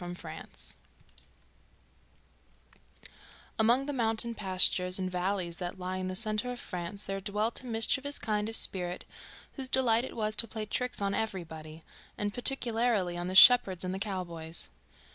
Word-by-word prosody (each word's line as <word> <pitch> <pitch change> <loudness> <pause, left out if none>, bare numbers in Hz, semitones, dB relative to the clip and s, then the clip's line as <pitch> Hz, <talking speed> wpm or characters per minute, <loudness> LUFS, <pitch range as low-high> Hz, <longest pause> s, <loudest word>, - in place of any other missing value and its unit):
A 175 0 -6
French - - -16 2.5
Puck - - -21 0.5
Among 240 +5 +3
the 290 - -3
mountain 230 -1 -1
pastures 185 -2 +3
and 185 -1 -2
valleys 180 -1 -2
that 180 0 -5
lie 185 0 -4
in 185 0 -3
the 185 - -4
centre 215 +3 0
of 245 - -6
France 180 +3 -6
there 195 0 -4
dwelt 210 +3 -2
a 255 - -11
mischievous 265 +5 +1
kind 210 -1 -1
of 225 - -3
spirit, 180 -4 +2 0.5
whose 265 -1 -2
delight 240 -3 +3
it - - -7
was 215 -2 -2
to 230 - +2
play 215 +1 -5
tricks 250 0 -2
on 200 0 0
everybody, 160 -7 -5 0.3
and 205 0 -2
particularly 235 -7 0
on 175 0 -3
the 185 - -4
shepherds 195 -5 +7
and 185 0 -3
the 190 - -4
cowboys. 170 -5 -5
205 Hz, 160 wpm, -30 LUFS, 180-230 Hz, 2.5 s, shepherds